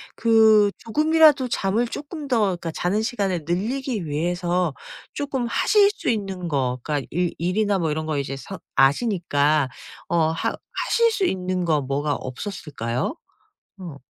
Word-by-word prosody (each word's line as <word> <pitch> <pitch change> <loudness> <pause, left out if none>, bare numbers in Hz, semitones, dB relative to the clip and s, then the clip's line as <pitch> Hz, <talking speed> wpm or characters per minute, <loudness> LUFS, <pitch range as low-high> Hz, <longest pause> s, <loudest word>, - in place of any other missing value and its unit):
그 220 -2 +5
조금이라도 305 +1 +4
잠을 225 +1 0
쪼끔 295 +3 -7
더 230 -6 +2
그니까 170 -1 -5
자는 195 +7 -1
시간을 195 -9 -2
늘리기 215 - -2
위해서 175 +1 -1 0.4
쪼끔 275 -4 -2
하실 405 - +3
수 415 - -4
있는 195 -5 -2
거 130 -5 -1
그니까 145 -1 -2
일 175 +1 0
일이나 200 +4 +1
뭐 165 -4 -1
이런 155 +1 -3
거 155 - -1 0.2
사 135 - -8 0.2
아시니까 150 - +2 0.4
어 170 - +1
하 165 - -1 0.4
하실 465 0 +3
수 410 -3 -1
있는 185 - -1
거 160 -3 +2
뭐가 140 +2 -1
없었을까요? 130 - -4 0.6
어. 175 -6 -8
185 Hz, 275 characters per minute, -23 LUFS, 155-230 Hz, 0.6 s, 그